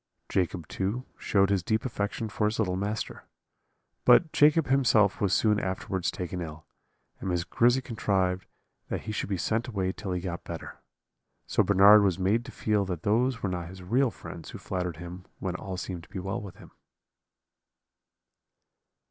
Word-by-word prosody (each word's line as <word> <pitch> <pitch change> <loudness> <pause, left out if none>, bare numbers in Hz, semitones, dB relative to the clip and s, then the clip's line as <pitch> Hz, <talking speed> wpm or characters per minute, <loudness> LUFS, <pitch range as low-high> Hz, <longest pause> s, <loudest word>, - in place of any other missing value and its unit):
Jacob 90 -3 -1
too 105 +7 -2
showed 100 -1 +2
his 100 -2 +2
deep 110 +6 0
affection 110 -2 -2
for 105 0 -1
his 105 - -2
little 90 -5 0
master. 105 +3 -3 0.8
But 160 - +5
Jacob 150 +1 +5
himself 120 -7 +3
was 100 -3 +2
soon 105 +1 +3
afterwards 95 -1 -2
taken 90 0 -4
ill, 80 -1 -7 0.5
and 95 - -4
Miss 90 -1 0
Grizzy 120 +8 +3
contrived 95 -6 0 0.4
that - - -3
he 110 - -5
should 105 - -3
be 95 - 0
sent 110 +7 -1
away 95 -6 -1
till 95 0 -6
he 90 - -1
got 85 -2 -5
better. - - -8 0.7
So - - +2
Bernard 100 +1 +7
was 95 -3 +2
made 100 +6 +1
to 130 - -8
feel 105 -3 +1
that 90 -3 -4
those 120 +4 +1
were 100 - +1
not 90 -2 -3
his 95 0 -10
real 125 +8 +2
friends 85 -7 -9
who - - -7
flattered 90 -4 -3
him 90 +2 -8
when 95 -2 -3
all 95 0 -5
seemed 90 -1 -5
to 80 - -17
be - - -7
well 95 +1 -3
with 100 -2 -9
him. - - -15
95 Hz, 175 wpm, -28 LUFS, 90-110 Hz, 0.8 s, Bernard